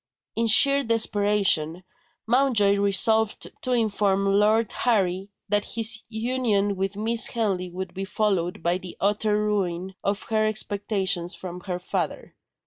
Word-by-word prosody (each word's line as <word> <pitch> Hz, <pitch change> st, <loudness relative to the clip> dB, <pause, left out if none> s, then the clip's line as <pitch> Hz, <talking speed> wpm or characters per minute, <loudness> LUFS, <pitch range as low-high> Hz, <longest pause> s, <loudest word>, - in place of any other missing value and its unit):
In 230 Hz, +1 st, +1 dB
sheer 275 Hz, +5 st, +5 dB
desperation, 205 Hz, -, +1 dB, 0.4 s
Mountjoy 230 Hz, -5 st, +3 dB
resolved 210 Hz, +2 st, +1 dB
to 255 Hz, -, -2 dB
inform 205 Hz, -4 st, +1 dB
Lord 215 Hz, +2 st, +3 dB
Harry 195 Hz, -4 st, 0 dB, 0.2 s
that 205 Hz, 0 st, +1 dB
his 225 Hz, 0 st, +1 dB
union 220 Hz, -3 st, 0 dB
with 195 Hz, +1 st, -3 dB
Miss 225 Hz, +2 st, +2 dB
Henley 195 Hz, -6 st, -2 dB
would 185 Hz, 0 st, -6 dB
be 195 Hz, +1 st, -4 dB
followed 190 Hz, -5 st, -1 dB
by 175 Hz, +2 st, +1 dB
the 180 Hz, -1 st, -10 dB
utter 210 Hz, +1 st, +1 dB
ruin 190 Hz, -3 st, -1 dB
of 200 Hz, 0 st, -1 dB
her 215 Hz, -1 st, 0 dB
expectations 195 Hz, -4 st, -2 dB
from 180 Hz, -1 st, -8 dB
her 180 Hz, -2 st, -3 dB
father. 180 Hz, -3 st, -4 dB
205 Hz, 135 wpm, -25 LUFS, 190-220 Hz, 0.4 s, sheer